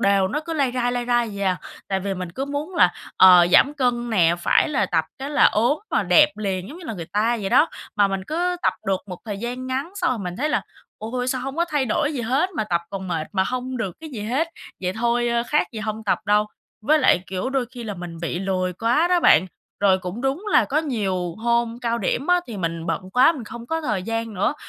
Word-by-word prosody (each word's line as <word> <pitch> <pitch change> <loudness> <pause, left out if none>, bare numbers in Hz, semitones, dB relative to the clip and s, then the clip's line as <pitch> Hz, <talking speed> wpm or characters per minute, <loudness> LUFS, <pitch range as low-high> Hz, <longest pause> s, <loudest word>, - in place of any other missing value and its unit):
đều, 200 -1 +3
nó 300 - -2
cứ 330 +1 -6
lai 275 -5 +1
rai, 245 -1 0
lai 245 -1 -2
rai 240 -1 +2
vậy 200 - -5
à. 185 -2 +1 0.3
Tại 195 -1 0
vì 195 0 -2
mình 180 -2 -6
cứ 265 - -3
muốn 290 +6 -4
là, - - +5 0.2
ờ, 180 -2 +8
giảm 285 +2 +6
cân 240 -4 0
nè, 170 -5 +4
phải - - +3
là 235 -10 +1
tập 160 -3 +1
cái 275 +2 -5
là 290 - +4
ốm 240 +8 +2
mà - - +2
đẹp 300 -1 +5
liền 195 -2 -3
giống 320 +5 -10
như 355 - -11
là 225 - -4
người 170 -4 -7
ta 225 +3 +2
vậy 195 - -3
đó! 325 - +5 0.3
Mà 200 -1 +4
mình 195 -1 -3
cứ 355 - -1
tập - - +3
được 190 -1 +1
một 180 -2 -7
thời 205 -3 -5
gian 250 +3 -5
ngắn 270 +7 -3
xong 360 -6 0
rồi 245 - -1
mình 180 -2 -5
thấy 300 +4 0
là 300 - 0 0.4
"Ôi! 250 +3 -3
Sao 255 -1 -1
hông 270 +3 -5
có 340 - +2
thay 290 -3 +1
đổi 290 +6 0
gì 260 - -3
hết, 270 +11 +1
mà 215 - 0
tập 170 -4 0
còn 190 -2 -5
mệt 160 -2 -2
mà 190 -1 +2
hông 255 0 -3
được 195 -7 -4
cái 315 -1 -8
gì 225 -6 -6
hết! 265 +10 0 0.3
Vậy 180 0 -1
thôi 240 +2 0 0.2
khác 300 - +2
gì 225 - -6
hông 220 0 -4
tập - - +1
đâu." 210 +1 +3 0.4
Với 310 +4 +4
lại, 180 - +4
kiểu, 190 +7 -3
đôi 270 -3 0
khi 245 -3 -8
là 210 - -4
mình 175 -2 -8
bị 170 0 -2
lười 185 -1 -1
quá 235 - +2
đó 355 -1 +3
bạn. 185 - +5 0.3
Rồi 190 -2 +4
cũng 180 +5 -6
đúng 270 +8 -1
là - - +5
có 285 - 0
nhiều 195 - -2
hôm 235 0 0
cao 235 -1 -1
điểm 240 +7 -1
á 360 0 +4
thì 225 - -7
mình 165 -2 -3
bận 185 +3 -3
quá 255 - +5
mình 265 -7 -7
không 235 +2 -9
có 325 +3 -1
thời 215 -11 -2
gian 225 0 -3
nữa. 195 +10 0
230 Hz, 260 wpm, -23 LUFS, 190-270 Hz, 0.4 s, ờ